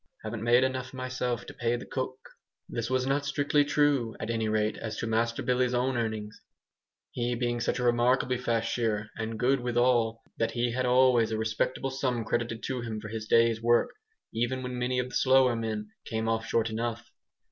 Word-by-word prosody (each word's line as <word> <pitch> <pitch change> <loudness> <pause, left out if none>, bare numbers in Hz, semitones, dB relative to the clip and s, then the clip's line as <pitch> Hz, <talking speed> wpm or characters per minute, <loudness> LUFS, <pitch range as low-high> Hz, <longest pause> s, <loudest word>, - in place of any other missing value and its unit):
"Haven't 110 0 -5
made 120 +2 +4
enough, 130 0 -2
myself, 125 -2 -3
to - - -9
pay 120 0 0
the 120 - -6
cook." 130 0 -3 0.5
This 115 0 -3
was 130 0 +1
not 140 +2 +1
strictly 145 +1 +2
true, 145 -6 +1
at 110 - -3
any 110 -1 -1
rate, 110 0 +1
as 110 -1 -5
to - - -2
Master 115 +1 0
Billy's 125 0 +1
own 125 +1 +1
earnings; 110 -2 -3 0.7
he 120 0 -1
being 120 0 -1
such - - 0
a 125 - -2
remarkably 125 +1 +2
fast 115 -3 0
shearer 105 -3 -1
(and 110 0 -4
good 130 +3 +2
withal), 120 -2 +1 0.2
that 115 - 0
he 120 0 0
had 125 +1 0
always 125 -3 +4
a 110 - 0
respectable 110 +4 -1
sum 130 -4 -1
credited 120 0 -2
to 130 -2 -2
him 115 -2 -4
for 105 0 -8
his 110 0 -5
days' 115 -1 +4
work, 120 +1 +3 0.4
even 120 +3 -1
when 125 0 -4
many 125 +1 0
of 125 0 -1
the 125 - -8
slower 130 -2 +4
men 110 -2 -3
came 110 0 -2
off 115 0 0
short 115 -1 +1
enough. 120 +1 -3
120 Hz, 195 wpm, -29 LUFS, 115-125 Hz, 0.7 s, made